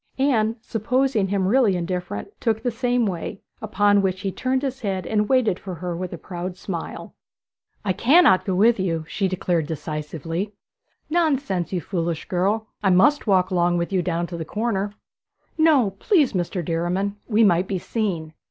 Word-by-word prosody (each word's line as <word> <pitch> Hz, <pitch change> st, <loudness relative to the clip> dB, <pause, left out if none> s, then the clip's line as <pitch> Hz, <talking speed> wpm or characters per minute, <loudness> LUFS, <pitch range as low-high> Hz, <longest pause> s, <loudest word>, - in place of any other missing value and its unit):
Anne, 230 Hz, -5 st, +2 dB
supposing 235 Hz, -1 st, 0 dB
him 190 Hz, -1 st, 0 dB
really 225 Hz, -3 st, +3 dB
indifferent, 180 Hz, -, -3 dB
took 220 Hz, -2 st, 0 dB
the 245 Hz, -, 0 dB
same 245 Hz, +1 st, +1 dB
way, 185 Hz, 0 st, -4 dB, 0.2 s
upon 205 Hz, -1 st, +3 dB
which 190 Hz, -1 st, -1 dB
he 195 Hz, -2 st, -2 dB
turned 260 Hz, +6 st, -1 dB
his 265 Hz, -1 st, -3 dB
head 195 Hz, -6 st, -2 dB
and 210 Hz, -1 st, 0 dB
waited 250 Hz, -8 st, +2 dB
for 185 Hz, -2 st, -6 dB
her 175 Hz, +1 st, -4 dB
with 180 Hz, +1 st, -4 dB
a 175 Hz, -, -6 dB
proud 180 Hz, +1 st, -6 dB
smile. 180 Hz, -3 st, -6 dB, 0.7 s
'I 190 Hz, -, +1 dB
cannot 255 Hz, -, +5 dB
go 190 Hz, -, -1 dB
with 220 Hz, +3 st, +4 dB
you,' 165 Hz, -4 st, -1 dB
she 195 Hz, +2 st, -1 dB
said 175 Hz, -4 st, -1 dB
decisively. 160 Hz, +4 st, -4 dB, 0.6 s
'Nonsense, 275 Hz, -, +1 dB
you 180 Hz, -2 st, -1 dB
foolish 170 Hz, -2 st, -3 dB
girl! 200 Hz, +5 st, 0 dB, 0.2 s
I 200 Hz, -, +2 dB
must 230 Hz, +11 st, +4 dB
walk 190 Hz, -1 st, +3 dB
along 175 Hz, -1 st, +2 dB
with 170 Hz, +3 st, -2 dB
you 185 Hz, -, +2 dB
down 175 Hz, -1 st, -1 dB
to 170 Hz, 0 st, -6 dB
the 165 Hz, -, -3 dB
corner.' 205 Hz, +1 st, -2 dB, 0.6 s
'No, 300 Hz, -10 st, +4 dB
please, 310 Hz, -, +3 dB
Mr. 175 Hz, -1 st, -2 dB
Derriman; 180 Hz, +5 st, -1 dB
we 225 Hz, 0 st, +3 dB
might 180 Hz, -2 st, +3 dB
be 195 Hz, -, -1 dB
seen.' 175 Hz, -6 st, -3 dB
195 Hz, 170 wpm, -23 LUFS, 175-225 Hz, 0.7 s, cannot